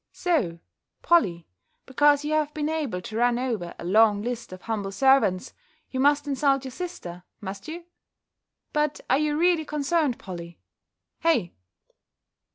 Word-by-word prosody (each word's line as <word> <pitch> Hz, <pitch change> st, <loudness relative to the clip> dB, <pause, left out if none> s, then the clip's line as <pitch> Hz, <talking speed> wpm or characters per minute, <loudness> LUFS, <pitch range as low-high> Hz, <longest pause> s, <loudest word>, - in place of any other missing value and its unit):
"So, 265 Hz, -, 0 dB, 0.5 s
Polly, 185 Hz, -, +3 dB, 0.4 s
because 290 Hz, +2 st, +3 dB
you 305 Hz, -, -1 dB
have 305 Hz, -1 st, +1 dB
been 300 Hz, 0 st, -1 dB
able 290 Hz, -13 st, -2 dB
to 215 Hz, +4 st, -6 dB
run 240 Hz, 0 st, +3 dB
over 225 Hz, -9 st, -3 dB
a -, -, -8 dB
long 210 Hz, +2 st, +4 dB
list 240 Hz, -2 st, -4 dB
of 185 Hz, -1 st, -10 dB
humble 210 Hz, -4 st, -3 dB
servants, 265 Hz, -5 st, +3 dB, 0.4 s
you 260 Hz, -, -3 dB
must 290 Hz, +1 st, +3 dB
insult 275 Hz, -1 st, +1 dB
your 260 Hz, -, -6 dB
sister, 250 Hz, -, -7 dB, 0.2 s
must 195 Hz, 0 st, -7 dB
you? 335 Hz, +2 st, -7 dB, 0.9 s
But 300 Hz, -1 st, 0 dB
are 265 Hz, -, +4 dB
you 300 Hz, -1 st, 0 dB
really 345 Hz, -1 st, +3 dB
concerned, 300 Hz, -2 st, 0 dB
Polly? 170 Hz, -2 st, -9 dB, 0.6 s
Hey!" 270 Hz, -, +1 dB
265 Hz, 145 wpm, -25 LUFS, 200-300 Hz, 0.9 s, long